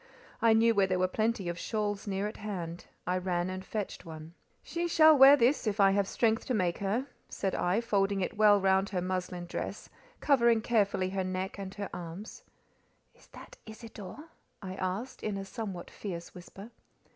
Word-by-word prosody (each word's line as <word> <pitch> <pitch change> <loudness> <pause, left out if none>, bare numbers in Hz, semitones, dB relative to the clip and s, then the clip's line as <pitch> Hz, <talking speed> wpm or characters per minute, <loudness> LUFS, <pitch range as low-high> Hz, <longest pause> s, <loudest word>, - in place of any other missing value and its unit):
I 230 -1 +5
knew 230 +1 +4
where 200 -2 +3
there 185 -1 0
were 185 0 +2
plenty 215 0 -1
of 170 0 -3
shawls 210 -2 -2
near 195 0 -1
at 210 - -7
hand; 180 -5 -6 0.2
I 180 +1 0
ran 180 0 -1
and 185 0 -5
fetched 210 0 -5
one. 160 0 -10 0.3
"She 345 0 -2
shall 315 -2 +6
wear 275 +1 +9
this, 250 0 +2
if 210 0 -1
I 195 -1 +6
have 200 0 +1
strength 225 0 +1
to 255 - 0
make 180 -4 0
her," 205 +7 -1 0.2
said 195 - -2
I, 180 +5 +1
folding 200 -3 +1
it 185 - -2
well 210 -1 +6
round 190 0 +2
her 185 -3 -2
muslin 180 -1 -3
dress, 175 - -5 0.3
covering 235 -5 +4
carefully 200 -5 +1
her 190 -1 -1
neck 185 +2 -4
and 195 -1 -6
her 200 -2 -5
arms. 175 +4 -8 0.7
"Is - - -23
that - - -13
Isidore?" 220 - -10 0.3
I 190 -2 -6
asked, 190 +7 -4
in 210 -2 -2
a 195 - -5
somewhat 195 -4 -6
fierce 175 -5 -7
whisper. 195 +5 -11
195 Hz, 185 wpm, -30 LUFS, 185-220 Hz, 0.7 s, wear